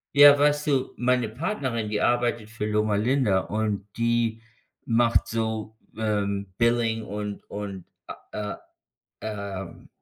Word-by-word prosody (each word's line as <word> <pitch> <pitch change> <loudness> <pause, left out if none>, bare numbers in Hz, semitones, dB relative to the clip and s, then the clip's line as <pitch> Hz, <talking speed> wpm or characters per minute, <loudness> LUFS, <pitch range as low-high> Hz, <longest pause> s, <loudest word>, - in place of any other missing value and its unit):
Ja, 145 0 +9
weißt 150 +1 +2
du, 135 -2 +1
meine 125 -2 +1
Partnerin, 130 - -2
die 105 0 -1
arbeitet 120 -3 +1
für 115 -2 -4
Loma 105 0 +1
Linda 110 -2 +2
und 105 -1 -2
die 115 -1 +1 0.4
macht 115 0 +3
so, 110 -1 -3 0.2
ähm, 100 -3 -1
Billing 115 -1 +2
und 105 -1 -6
und, 100 -3 -6 0.5
äh, 105 -1 -3 0.7
ähm, 100 -3 -6
110 Hz, 120 wpm, -26 LUFS, 105-120 Hz, 0.7 s, Ja